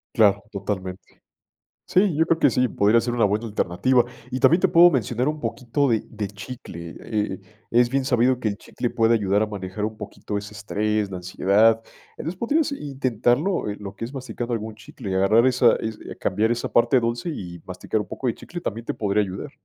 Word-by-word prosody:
Claro, 105 -2 +4
totalmente. 95 -2 -5 0.7
Sí, 185 -4 +3
yo 160 - +4
creo 165 0 +1
que - - +5
sí, 125 +1 +2
podría 105 +2 +3
ser 120 +1 -2
una 120 -2 +3
buena 105 +3 0
alternativa. 110 +4 +2 0.3
Y 130 - -2
también 170 +7 +5
te - - +5
puedo 175 +1 +7
mencionar 125 - 0
un 150 0 -1
poquito 135 +1 -1
de 110 -2 +1
de 105 - -4
chicle. 100 -5 -9
Eh, 105 -4 -2 0.3
es 120 +1 +4
bien 135 -1 0
sabido 125 0 +2
que 115 - -1
el 100 -1 -2
chicle 120 - -4
puede 115 -1 +2
ayudar 100 -1 +2
a - - +1
manejar 100 0 -4
un 110 0 -4
poquito 105 - -7
ese 105 +1 -7
estrés, 105 -1 -1
la 95 - -4
ansiedad. 100 +5 +3 0.4
Entonces 175 +4 -5
podrías 290 +5 +1
intentarlo, 135 - 0
eh, 100 - -3
lo 100 -1 -8
que 115 - -5
es 125 - -9
masticando 125 -2 -5
algún 110 -1 -3
chicle 110 -1 -8
y - - -1
agarrar 100 +6 +4
esa 125 -2 +4
es, 110 -1 -4
eh, - - -8
cambiar 110 +5 +1
esa 120 - -2
parte 125 +2 +4
dulce 120 +6 -2
y 90 - -7
masticar 90 +4 -3
un - - -8
poco - - -7
de 120 - +1
chicle 175 +8 -9
también 115 -3 -4
te - - -2
podría 105 0 +1
ayudar. 100 +8 -5
115 Hz, 210 wpm, -23 LUFS, 100-130 Hz, 0.7 s, puedo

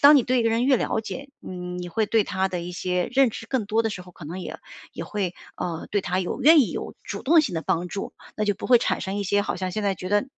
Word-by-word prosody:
当 285 +1 +9
你 270 - +5
对 255 +2 +1
一 - - +3
个 230 - +2
人 230 +2 +2
越 270 -1 +5
了 - - 0
解， 225 +6 -7 0.2
嗯， 180 -1 -5
你 175 0 -5
会 215 +5 0
对 220 +1 +3
她 190 0 0
的 180 -2 -3
一 175 +1 -5
些 180 0 -1
认 270 0 +5
知 225 - -8
更 240 -4 -1
多 220 +2 +2
的 225 - 0
时 190 -3 -6
候， 180 0 -15
可 165 - -11
能 170 +5 -6
也 - - -6 0.3
也 - - -5
会， 195 -4 -2 0.2
呃， 170 -2 -4
对 205 - +2
她 185 -1 -1
有 180 +8 -3
愿 310 +3 +8
意 250 - +2
有 - - -5
主 - - -6
动 320 +4 +6
性 270 - -2
地 160 - -2
帮 175 +2 0
助， 195 - -5 0.2
那 215 - 0
就 205 -1 +2
不 - - -6
会 245 -1 +8
产 - - 0
生 190 +1 -3
一 205 - -1
些 205 +2 +2
好 - - -2
像 185 0 -2
现 215 - -2
在 200 -1 +1
觉 185 - -5
得 205 +3 +3
205 Hz, 325 characters per minute, -25 LUFS, 180-230 Hz, 0.3 s, 当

